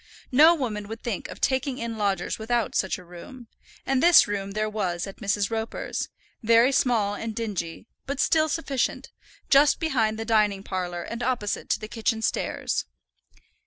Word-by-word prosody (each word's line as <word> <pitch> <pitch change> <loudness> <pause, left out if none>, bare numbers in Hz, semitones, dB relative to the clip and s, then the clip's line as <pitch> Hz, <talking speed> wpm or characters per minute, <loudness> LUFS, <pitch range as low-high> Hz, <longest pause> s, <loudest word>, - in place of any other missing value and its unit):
No 310 +6 +7
woman 215 -8 -3
would 225 +2 -8
think 230 -6 -3
of - - -10
taking 265 0 0
in 230 -2 -4
lodgers 200 -3 -1
without 230 +1 -1
such 190 - 0
a 180 - -12
room; 180 +8 -12 0.4
and 270 -1 +1
this 345 0 +7
room 200 -1 -3
there 215 +1 0
was 190 -5 -2
at 195 - -9
Mrs. 200 +1 0
Roper's, 225 0 -3 0.3
very 230 +3 +5
small 230 -6 +2
and 220 +1 -5
dingy, 205 -6 -4 0.2
but 280 0 -3
still 315 +1 +3
sufficient, 285 -5 -2 0.4
just 285 +1 +5
behind 235 -9 0
the 225 - -4
dining 210 -3 +2
parlour 180 -3 -4
and 230 +1 -6
opposite 240 -5 -2
to - - +1
the 215 - -7
kitchen 225 0 -1
stairs. - - -1
225 Hz, 165 wpm, -25 LUFS, 205-255 Hz, 0.4 s, No